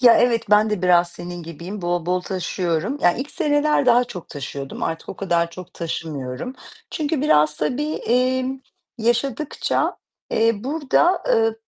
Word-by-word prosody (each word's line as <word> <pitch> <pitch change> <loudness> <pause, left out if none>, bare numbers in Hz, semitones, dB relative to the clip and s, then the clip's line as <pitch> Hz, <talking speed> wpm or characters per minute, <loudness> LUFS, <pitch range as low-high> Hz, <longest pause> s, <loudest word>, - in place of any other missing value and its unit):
Ya, 240 -2 +8
evet, 230 -4 +2
ben 210 +1 +5
de 210 -4 -1
biraz 175 -1 +5
senin 175 0 -7
gibiyim, 170 +5 -7
bol 175 -1 -1
bol 180 +1 +1
taşıyorum. 180 - -2
Ya, 175 - +6
ilk 270 +8 -5
seneler 300 -4 +2
daha 245 0 +5
çok 180 -8 -9
taşıyordum. 140 -1 -6
Artık 165 0 -3
o - - -6
kadar 170 -3 0
çok 180 +1 -11
taşımıyorum. 155 - -4 0.4
Çünkü 305 -2 -1
biraz 150 - +4
tabii, 290 - -1
emm, 255 +2 +1 0.4
yaşadıkça, 240 +5 0 0.3
eee, 225 +1 +3
burada, 315 +5 +2
eee, 225 0 +3
210 Hz, 150 wpm, -22 LUFS, 170-260 Hz, 0.4 s, Ya